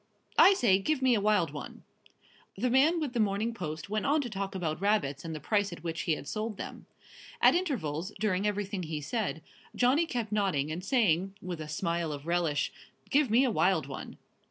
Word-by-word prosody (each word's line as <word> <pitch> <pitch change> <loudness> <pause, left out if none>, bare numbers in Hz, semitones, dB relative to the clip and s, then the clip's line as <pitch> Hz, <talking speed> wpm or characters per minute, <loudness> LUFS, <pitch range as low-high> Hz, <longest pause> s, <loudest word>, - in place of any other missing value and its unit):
"I 395 - +8
say, 195 - +4
give 265 +6 -1
me 260 -1 +5
a 215 - +2
wild 205 -7 +2
one." 145 -1 -8 0.7
The 245 +4 0
man 300 +7 +4
with 290 -6 -3
The 240 - -1
Morning 215 +2 +1
Post 160 -6 -5
went 215 +1 -1
on 295 +2 +3
to 245 -5 -5
talk 195 -1 -4
about 165 -3 -2
rabbits 200 -9 +1
and 165 -1 -5
the - - -5
price 205 +2 0
at 170 -2 -9
which 165 -1 -3
he 165 - +1
had 145 - -6
sold 215 +5 -3
them. - - -8 0.5
At - - +6
intervals, 200 - -2
during 205 -1 +1
everything 205 -1 -2
he 155 -2 -4
said, 175 0 -3 0.3
Johnny 270 +7 +3
kept 235 -7 -3
nodding 190 -9 0
and 170 +3 -4
saying, 195 - +2
with 175 -3 -6
a 155 - -6
smile 170 +1 -2
of 145 0 -6
relish: 170 -4 0 0.4
"Give 285 -2 +3
me 235 +5 +5
a 255 - +2
wild 185 -7 +2
one!" 135 -1 -8
195 Hz, 205 wpm, -30 LUFS, 165-230 Hz, 0.7 s, I